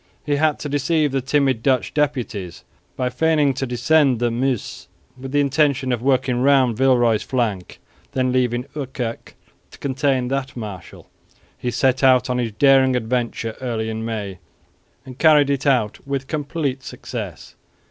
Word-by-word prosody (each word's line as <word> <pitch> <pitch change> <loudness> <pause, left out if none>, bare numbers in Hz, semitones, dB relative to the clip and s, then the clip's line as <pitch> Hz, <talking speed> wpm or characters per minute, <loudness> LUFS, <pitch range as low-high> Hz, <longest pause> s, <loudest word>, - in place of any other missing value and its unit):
He 145 -1 0
had 155 0 +2
to - - -4
deceive 145 +1 +1
the 135 0 0
timid 135 -2 +1
Dutch 130 0 +1
deputies 120 - -2 0.3
by 125 -1 -1
feigning 155 -3 +2
to 135 +1 -3
descend 135 +2 +2
the 120 0 0
Meuse 125 -1 -2 0.3
with 130 +1 -8
the 145 - +2
intention 140 -2 +1
of 120 -2 -1
working 130 -1 +1
round 130 -3 +4
Villeroy's 120 -3 +3
flank; 110 -8 -3 0.3
then, 130 -1 +1
leaving 125 -1 0
Ouwerkerk 130 -5 -5 0.3
to - - -15
contain 135 -2 0
that 135 -1 -3
marshal, 105 -6 -8 0.5
he 125 - -4
set 130 +2 +1
out 130 -1 +4
on 125 - 0
his 115 -2 -2
daring 135 +1 +4
adventure 115 -1 -2
early 110 -3 -2
in 110 0 -4
May 105 -5 -5 0.7
and 130 -1 -11
carried 150 -3 +5
it 140 +1 -1
out 120 -6 +1
with 135 -1 -2
complete 145 -2 -3
success. 105 - -7
130 Hz, 155 wpm, -21 LUFS, 120-140 Hz, 0.7 s, carried